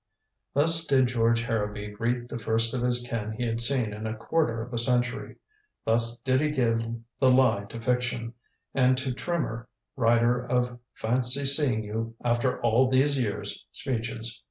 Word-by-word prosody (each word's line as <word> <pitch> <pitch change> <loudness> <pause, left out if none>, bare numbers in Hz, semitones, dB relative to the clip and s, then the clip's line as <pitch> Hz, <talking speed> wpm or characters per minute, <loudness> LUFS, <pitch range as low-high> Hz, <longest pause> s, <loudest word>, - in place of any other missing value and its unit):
Thus 165 +3 +3
did 130 -3 +3
George 115 -1 +1
Harrowby 105 -2 -3
greet 120 +3 -2
the 120 - -6
first 115 +1 +3
of 125 - -2
his 120 0 +1
kin 110 -2 -4
he 120 +3 -3
had 115 0 +1
seen 120 -3 +3
in 110 +1 -5
a 110 - -4
quarter 120 -2 0
of 125 +2 -11
a 120 - +1
century. 125 0 +1 0.5
Thus 115 +1 +1
did 130 +1 +1
he 155 - +1
give 120 -6 +1 0.4
the 130 - +4
lie 125 -6 +3
to 115 +3 -8
fiction, 120 -1 -2 0.4
and 130 -1 +3
to 130 -1 -2
Trimmer, 125 -7 -3 0.3
writer 120 0 +2
of 125 0 -1 0.2
"fancy 125 +4 0
seeing 135 -5 +3
you 115 +2 -5
after 120 +1 0
all 120 +3 +3
these 135 +1 +2
years" 105 -4 -3
speeches. 115 -2 -3
120 Hz, 165 wpm, -27 LUFS, 115-130 Hz, 0.5 s, the